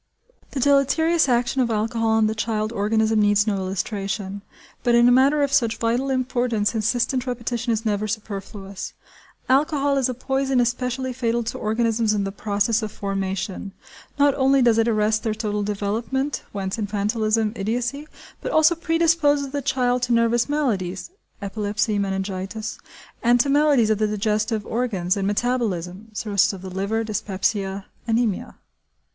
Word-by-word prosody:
The 280 - -4
deleterious 285 +4 +3
action 245 +2 +1
of 240 - +1
alcohol 225 +1 0
on 220 0 +3
the 215 - +1
child 220 0 -2
organism 220 +1 +2
needs 205 0 +3
no 210 -3 0
illustration, 195 +1 -3 0.4
but 240 -1 +3
in 240 0 +6
a - - +6
matter 275 +4 +4
of 280 -1 -1
such 230 -5 +2
vital 240 +4 0
importance 245 -5 0
insistent 245 +4 0
repetition 240 -1 -2
is 225 0 -1
never 210 0 0
superfluous. 200 -2 -6 0.5
Alcohol 285 0 +2
is 260 -1 +1
a 255 - -3
poison 265 +1 0
especially 250 +1 -1
fatal 235 -1 0
to 225 - -4
organisms 225 0 +1
in 200 - 0
the 195 - -3
process 210 +3 0
of 215 -1 -4
formation. 195 0 -4 0.4
Not 285 0 +4
only 270 0 +3
does 230 -2 +4
it 225 - +3
arrest 215 -1 +2
their 220 -2 -2
total 210 -1 -2
development 215 +7 -2
(whence 195 0 -3
infantilism, 215 +1 0
idiocy), 240 +8 -2 0.3
but - - -3
also 315 +2 +5
pre 330 0 -1
disposes 295 -4 +3
the 285 +1 -3
child 250 -2 +1
to 245 -1 +1
nervous 230 +1 +2
maladies 210 - -1 0.3
(epilepsy, 210 +1 -1
meningitis), 195 +2 -3 0.4
and 240 0 +4
to 275 +3 +2
maladies 285 -6 +4
of 215 - +1
the 215 - +2
digestive 210 +1 -1
organs, 205 -7 -1
and 195 -1 -1
metabolism 205 -4 -1
(cirrhosis 205 -2 +1
of 190 -1 -9
the 190 - -7
liver, 200 +4 -1
dyspepsia, 200 -1 -2 0.2
anæmia). 225 -3 0
225 Hz, 155 wpm, -23 LUFS, 205-250 Hz, 0.5 s, in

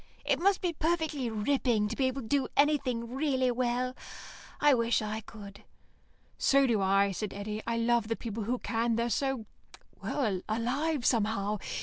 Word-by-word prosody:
"It - - +2
must 390 +2 +2
be 355 -2 0
perfectly 315 -5 -1
ripping 225 -1 +1
to 230 - -4
be 265 - +1
able 260 0 -3
to - - -9
do 275 0 +1
anything 255 -5 +1
really 265 -3 +1
well. 250 +1 -1 0.6
I 295 -1 +5
wish 230 -1 +2
I 215 0 -3
could." 205 -2 -12 0.8
"So 275 0 +4
do 230 -5 +2
I," 195 +1 +3
said 205 +2 -4
Eddy. 210 +1 -4
"I 230 0 0
love 230 -1 +2
the 225 - -1
people 225 -2 -5
who 250 +3 0
can. 230 -1 0
They're 235 +1 0
so 270 -4 -1 0.6
well, 215 -10 -1
alive, 255 +6 -1
somehow. 210 -3 +1
235 Hz, 165 wpm, -30 LUFS, 215-270 Hz, 0.8 s, I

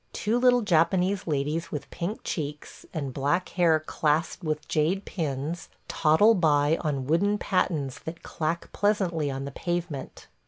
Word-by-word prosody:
Two 225 +3 0
little 245 -1 +4
Japanese 185 +1 +2
ladies 155 +3 -1
with 150 - -4
pink 180 +6 -4
cheeks, 150 -2 -5
and 140 -6 -4
black 145 +7 0
hair 170 -3 +3
clasped 155 +2 -1
with 155 -2 -2
jade 170 +6 +1
pins, 155 0 -3 0.2
toddle 165 +9 +4
by 155 -5 +3
on 140 -5 -1
wooden 200 +8 +2
pattens 155 -10 -1
that 165 +1 -8
clack 165 +2 -3
pleasantly 185 -7 +1
on 135 0 -4
the 140 - -5
pavement. 175 -4 -4
165 Hz, 145 wpm, -27 LUFS, 150-185 Hz, 0.2 s, little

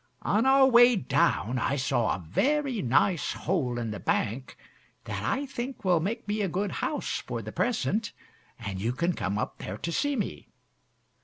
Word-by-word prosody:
On 225 +5 +2
our 270 0 +6
way 245 -1 +7
down 125 - +1
I 135 - 0
saw 130 -4 +1
a 90 - -9
very 275 - +1
nice 145 +7 +2
hole 145 -9 -1
in 115 -2 -3
the 105 - -5
bank 125 +4 -2 0.5
that - - -4
I 275 +2 -1
think 255 -3 -6
will 180 -3 +4
make 210 +7 -3
me 210 +1 -1
a 200 - +1
good 195 +4 -1
house - - -2
for - - -5
the - - -7
present, 215 - 0 0.5
and 100 -5 -5
you 115 +4 0
can 170 +7 0
come 100 - -2
up 110 - -3
there 95 - -5
to 170 - -4
see 285 - 0
me. 215 - -4
180 Hz, 180 wpm, -28 LUFS, -, 0.5 s, way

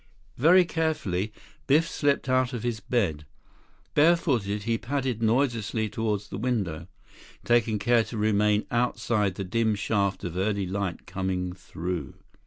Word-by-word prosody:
2 - - -11
Very 180 +5 +7
carefully, 150 - -1 0.4
Biff 155 +4 +4
slipped 145 -3 0
out 130 0 +2
of 120 -2 -4
his 120 -2 -2
bed. 95 -9 -1 0.7
Bare 165 +4 +6
footed, 105 - -1
he 115 +1 0
padded 130 -3 -2
noiselessly 115 -2 +1
toward 105 -1 -1
the 105 -1 -8
window, 105 -10 -2 0.6
taking 115 -2 +3
care 115 +3 +3
to 110 0 -7
remain 105 0 +2
outside 115 -4 0
the 100 - -4
dim 110 +3 +1
shaft 100 -1 -1
of 85 -1 -4
early 100 0 0
light 95 -1 -3
coming 90 -1 -2
through. 90 -1 -5
110 Hz, 145 wpm, -27 LUFS, 100-125 Hz, 0.7 s, Very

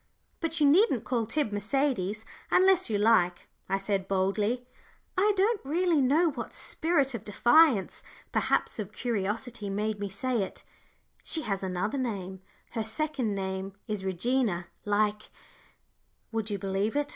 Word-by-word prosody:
"But 330 -1 -2
you 295 - +5
needn't 300 - +4
call 235 -4 -1
Tib 290 -1 -1
'Mercedes,' 215 -1 -1 0.2
unless 375 -4 +4
you 210 - +1
like," 205 -5 +3 0.2
I 195 - +2
said, 195 -1 -1
boldly 205 +6 0 0.5
I 405 +3 +4
don't 410 +2 +2
really 330 +2 +2
know 305 +6 +3
what 245 -4 -6
spirit 290 -5 0
of 225 -4 -5
defiance, 240 - +4 0.3
perhaps - - 0
of 205 -2 -4
curiosity, 220 -1 -3
made 210 +1 -2
me 200 -1 -3
say 235 +4 -1
it 190 - -5 0.6
"she 320 - -2
has 195 -3 -2
another 190 +7 -2
name; 190 -6 -4 0.3
her 225 -2 -2
second 240 -2 -2
name 190 0 -3
is 210 -3 -3
Regina, 190 -1 0 0.2
like 210 +1 0 0.5
" - - -44
Would 225 -1 -2
you 205 - -1
believe 195 +4 -1
it? 290 0 0
220 Hz, 145 wpm, -29 LUFS, 195-275 Hz, 0.6 s, you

